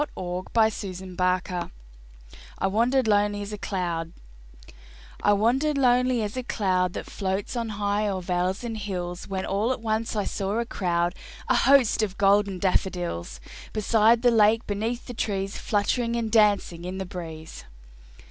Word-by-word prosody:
Wallace 180 0 -4
Rice 220 -1 +3
[1859 185 -1 -2 0.9
"I - - -1
WANDERED 235 +5 +2
LONELY 205 -1 +2
AS 205 +1 -7
A - - -4
CLOUD" 170 -4 -3 1.1
I - - +4
wandered 255 +9 +2
lonely 250 -2 +3
as 210 +2 -4
a 255 - -2
cloud 185 -7 0
That - - -5
floats 190 +3 -3
on 230 -2 -2
high 205 +1 0
o'er 195 -2 -1
vales 180 +3 -1
and 225 -2 -4
hills, 180 -3 -5
When 190 -1 -3
all 205 +5 0
at 260 - -2
once 220 0 -2
I 205 - 0
saw 200 +2 -2
a 235 - 0
crowd, 175 -5 0 0.4
A 255 - +4
host, 260 -2 +4
of 205 -3 -2
golden 200 -1 +3
daffodils; 175 - -1 0.3
Beside 225 +2 +3
the 245 - +5
lake, 220 +1 +4
beneath 225 +4 -3
the 245 - -7
trees, 195 -3 -2
Fluttering 230 +3 0
and 230 -2 -2
dancing 205 -6 +3
in 180 +1 -5
the 190 - -3
breeze. 160 -3 -8
205 Hz, 155 wpm, -25 LUFS, 185-225 Hz, 1.1 s, the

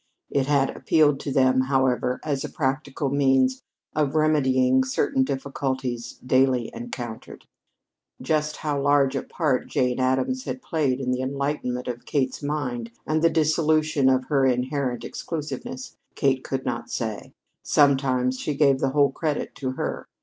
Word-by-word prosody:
It 135 -1 +1
had 140 -2 +2
appealed 150 -4 +3
to 140 - -4
them, 130 -1 +3
however, 130 -2 +1
as 145 -3 -2
a - - -4
practical 140 0 -2
means 135 -2 +2 0.3
of 150 -1 0
remedying 130 -4 +3
certain 265 - 0
difficulties 130 - -3
daily 130 -2 +2
encountered. 125 - -7 0.7
Just 150 -1 -1
how 145 -2 -2
large 140 -1 +3
a - - 0
part 150 -7 -1
Jane 125 -3 0
Addams 130 - 0
had 260 - -5
played 140 -6 0
in 130 -2 -1
the 125 0 -1
enlightenment 135 -2 -2
of 120 -1 -5
Kate's 130 -4 -1
mind 130 -6 -3 0.2
and 155 0 0
the 165 - +5
dissolution 155 -3 +2
of 130 -1 +2
her 140 -1 +1
inherent 130 0 0
exclusiveness, 245 - -6 0.2
Kate 135 -2 +1
could 135 -1 -3
not 120 -1 -3
say. 110 -3 -4 0.3
Sometimes 130 -3 +2
she 150 - -2
gave 140 -2 +3
the 135 - +1
whole 140 0 +3
credit 150 +1 -2
to 130 -2 -3
her. - - -4
135 Hz, 150 wpm, -24 LUFS, 130-150 Hz, 0.7 s, the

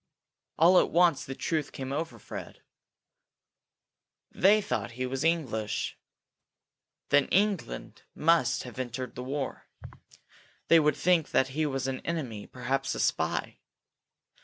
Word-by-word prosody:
All 175 +3 +7
at - - +2
once 170 -4 +3
the 135 - -6
truth 155 -1 -2
came 135 0 -5
over 150 -4 -3
Fred. - - -9 1.7
They 205 +3 +5
thought 200 - -3
he 125 +2 -3
was 135 +2 -3
English! 130 -11 -1 1.1
Then 145 -1 +4
England 195 - -1
must 165 -4 +2
have 125 0 -9
entered 125 0 -4
the 125 - -7
war! 135 +1 -4 1.0
They 165 - +8
would 150 -2 +2
think 175 -3 +2
that 130 - +2
he 155 +3 -1
was 135 -2 -2
an 130 -1 -2
enemy, 130 -11 -4
perhaps 135 +2 -2
a - - -5
spy! - - -1
135 Hz, 130 wpm, -29 LUFS, 130-165 Hz, 1.7 s, They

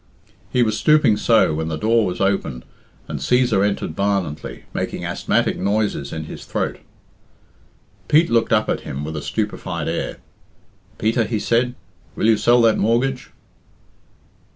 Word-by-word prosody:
He 125 - +2
was 110 -1 0
stooping 150 -8 +4
so 110 -6 +3
when 80 +1 -2
the 80 -1 -3
door 110 +3 +2
was 90 -1 -4
opened 95 -11 -1 0.4
and - - -5
Cæsar 125 -5 +2
entered 100 -5 -1
violently, 95 -6 -2
making - - -3
asthmatic - - 0
noises 100 -6 -1
in 80 - -4
his 80 - -9
throat. - - -3 1.3
Pete 160 0 +4
looked 115 -1 +2
up 110 -2 +3
at - - 0
him 70 +2 -6
with 80 +1 -5
a 75 - -4
stupefied 95 -4 -3
air. 85 - -3 0.8
"Peter," 115 +1 +1
he 110 +1 -2
said, 120 +3 +1 0.4
"will - - -1
you 110 -1 +5
sell 120 +2 +4
that 115 -1 +4
mortgage?" 125 +4 0
105 Hz, 150 wpm, -21 LUFS, 90-115 Hz, 1.3 s, you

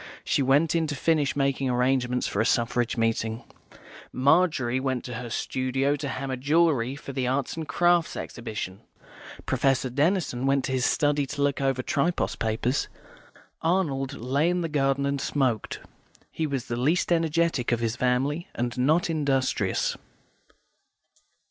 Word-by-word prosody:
She - - +1
went 140 +4 +3
in 165 -2 +1
to 145 - -3
finish 150 -1 +1
making 135 -1 0
arrangements 125 0 +1
for 100 - 0
a - - +3
Suffrage 120 0 +1
meeting. 115 0 -1 0.7
Margery 140 -3 +2
went 130 -2 -2
to 125 - -6
her 120 0 -5
studio 130 +4 0
to 145 - -4
hammer 130 -1 -3
jewellery 140 -3 +2
for 140 -1 -8
the 130 -1 -1
Arts 135 +1 -1
and 160 -2 -5
Crafts 175 -1 +2
Exhibition. 110 -5 -6 0.6
Professor 135 -2 +1
Denison 145 -3 0
went 135 -1 +2
to - - -3
his 130 -1 +1
study 145 -2 +1
to 145 +1 -2
look 140 -1 0
over 135 -2 0
Tripos 165 +8 0
papers. 115 +4 -1 0.7
Arnold 150 -6 0
lay 140 +6 0
in 180 0 0
the 165 - -2
garden 140 -1 +1
and 140 0 -1
smoked. 130 -7 -1 0.5
He 160 - -2
was 135 -4 -3
the 120 - -3
least 155 +9 +1
energetic 165 -6 +1
of 120 - +1
his 115 -1 -1
family, 130 +6 0
and 120 0 -2
not 155 +8 +3
industrious. 135 - 0
135 Hz, 150 wpm, -26 LUFS, 125-150 Hz, 0.7 s, went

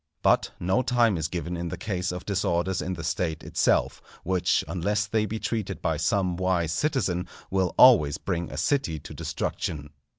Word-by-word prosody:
But - - +3
no 95 +8 +1
time 120 -5 +2
is 80 -2 -1
given 85 0 -4
in 85 0 -3
the - - -5
case 90 -4 -2
of 90 +1 -6
disorders 95 -2 0
in 95 - -3
the 80 - -7
State 80 0 -2
itself, - - +1 0.2
which 90 0 +1
unless 100 +3 0
they 110 0 0
be 110 - -3
treated 105 -4 -3
by 80 -2 -1
some 90 +2 0
wise 90 -3 0
citizen, 95 - 0 0.2
will 95 -2 0
always 95 - +7
bring 85 -3 -3
a - - -7
city 135 - 0
to - - -10
destruction. 75 -2 -4
90 Hz, 175 wpm, -26 LUFS, 85-105 Hz, 0.2 s, always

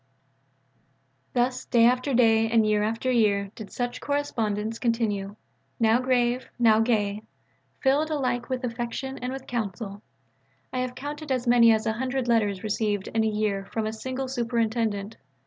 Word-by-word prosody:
Thus 250 +1 0
day 235 -2 +4
after 255 +2 +2
day 225 -2 +4
and 225 -1 +4
year 210 -1 +2
after 225 +4 -1
year 200 -4 +2
did 215 -3 -10
such 245 -1 -3
correspondence 225 -6 -2
continue 210 -4 -1 0.4
now 225 +1 +4
grave, 250 -1 +1
now 225 -3 +5
gay; 215 -3 +1 0.6
filled 290 +3 +2
alike 255 -5 -1
with 255 0 -2
affection 245 +2 -4
and 250 +1 -3
with 265 0 -6
counsel. 205 -3 -4 0.7
I 255 - -1
have 250 0 -3
counted 295 +2 -6
as 255 -1 0
many 240 -1 +6
as 220 0 +1
a 220 - +1
hundred 255 +1 -2
letters 210 -5 +1
received 210 -2 -1
in 225 0 +1
a - - +2
year 210 -2 -1
from 220 -1 -1
a 215 - -2
single 260 +4 -4
Superintendent. 230 -4 -1
230 Hz, 155 wpm, -26 LUFS, 215-255 Hz, 0.7 s, many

